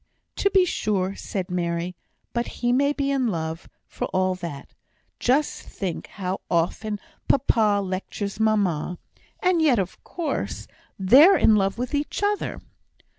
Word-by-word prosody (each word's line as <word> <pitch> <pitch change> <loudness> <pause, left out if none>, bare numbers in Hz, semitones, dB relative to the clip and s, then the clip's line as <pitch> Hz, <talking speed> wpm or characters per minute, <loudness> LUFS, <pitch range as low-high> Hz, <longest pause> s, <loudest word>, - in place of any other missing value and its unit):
"To 400 - +3
be 380 -2 +4
sure," 195 - -1
said 185 -3 -4
Mary; 170 0 -2 0.4
"but 235 0 -1
he 245 0 +1
may 280 +3 +3
be 280 -1 -1
in 265 -3 +1
love, 165 -4 -3 0.2
for - - -4
all 185 0 +1
that. 170 -6 -7 0.5
Just 280 +5 +1
think 185 -4 -5
how 190 -1 -4
often 205 +5 0 0.3
papa 220 -6 +3
lectures 195 +2 -4
mamma; 195 -6 +1 0.5
and 365 -3 +3
yet, 290 -6 +4
of 190 -2 -3
course, 340 -3 -3 0.3
they're 265 - +7
in 220 - +5
love 195 0 +1
with 250 +3 -3
each 290 +7 -2
other." 415 0 -1
205 Hz, 140 wpm, -24 LUFS, 185-275 Hz, 0.5 s, they're